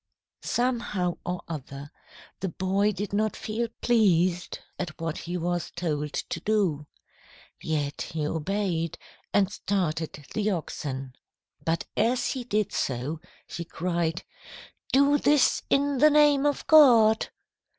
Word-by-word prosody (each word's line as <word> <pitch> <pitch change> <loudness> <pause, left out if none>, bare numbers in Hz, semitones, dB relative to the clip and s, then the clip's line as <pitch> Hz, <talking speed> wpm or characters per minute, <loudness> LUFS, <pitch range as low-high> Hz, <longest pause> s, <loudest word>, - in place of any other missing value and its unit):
"Somehow 235 -8 -1
or 180 0 -4
other, 145 -2 -7 0.5
the 190 - -2
boy 195 +4 +1
did 200 0 -5
not 215 +1 +1
feel 225 +2 -3
pleased 185 -6 +2 0.2
at 175 -4 -5
what 165 -1 -3
he 175 +1 -4
was 175 0 -2
told 150 -4 -2
to 170 - -3
do. 180 -7 0 0.7
Yet 145 -2 -2
he 155 -2 -3
obeyed, 165 +1 -2 0.3
and 200 -1 +2
started 165 -8 -2
the 215 -1 0
oxen. 135 -7 -4 0.5
But 165 +1 -1
as 240 +3 +1
he 260 -2 -4
did 215 -3 -1
so, 135 +5 -2 0.3
he 170 - -6
cried, 170 0 -2 0.7
'Do 280 +2 +4
this 290 -3 +3
in 280 -1 +2
the 305 +3 +7
name 295 -1 +5
of 290 - -1
God!' 235 -8 +6
185 Hz, 125 wpm, -27 LUFS, 160-220 Hz, 0.7 s, the